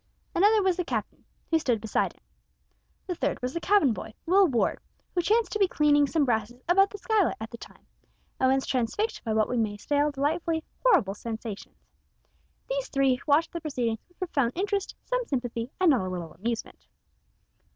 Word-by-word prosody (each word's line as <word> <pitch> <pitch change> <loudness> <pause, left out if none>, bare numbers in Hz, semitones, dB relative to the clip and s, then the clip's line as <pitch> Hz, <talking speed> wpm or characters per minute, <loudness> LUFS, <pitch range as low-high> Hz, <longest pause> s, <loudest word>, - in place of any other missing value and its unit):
Another 415 +3 +4
was 375 -2 +2
the 360 - 0
captain, - - -4 0.3
who 325 - +4
stood 245 -7 +1
beside 220 0 -1
him. - - -31 0.8
The 365 - -2
third 285 -4 -2
was 250 +1 -3
the 335 - -2
cabin 370 - +3
boy, 215 +2 -8
Will 385 +3 +5
Ward, 245 -7 0 0.3
who 355 - +1
chanced 440 +6 +2
to 425 - -2
be 390 - +5
cleaning 290 -3 +3
some 305 0 +1
brasses 240 +1 -1
about 390 +3 +5
the 410 - -8
skylight 420 -2 +1
at 220 0 -7
the 235 - -9
time, - - -14 0.5
and 260 0 +4
was 270 0 +1
transfixed 260 - -1
by 220 -2 -1
what 215 -1 +3
we 250 - -2
may 215 -2 0
style 290 +7 +1
delightfully 320 +3 -1 0.2
horrible 330 - +4
sensations. 220 -1 -7 0.9
These - - -2
three 270 -2 +2
watched 305 +3 +3
the 340 - -4
proceedings 245 -7 -2
with 355 - -30
profound 275 -10 0
interest, 400 +2 -1
some - - 0
sympathy, 245 -3 -3
and 365 -3 +5
not 255 - +3
a 185 - -3
little 175 -3 -5
amusement. 225 +6 -5
285 Hz, 185 wpm, -27 LUFS, 235-365 Hz, 0.9 s, Will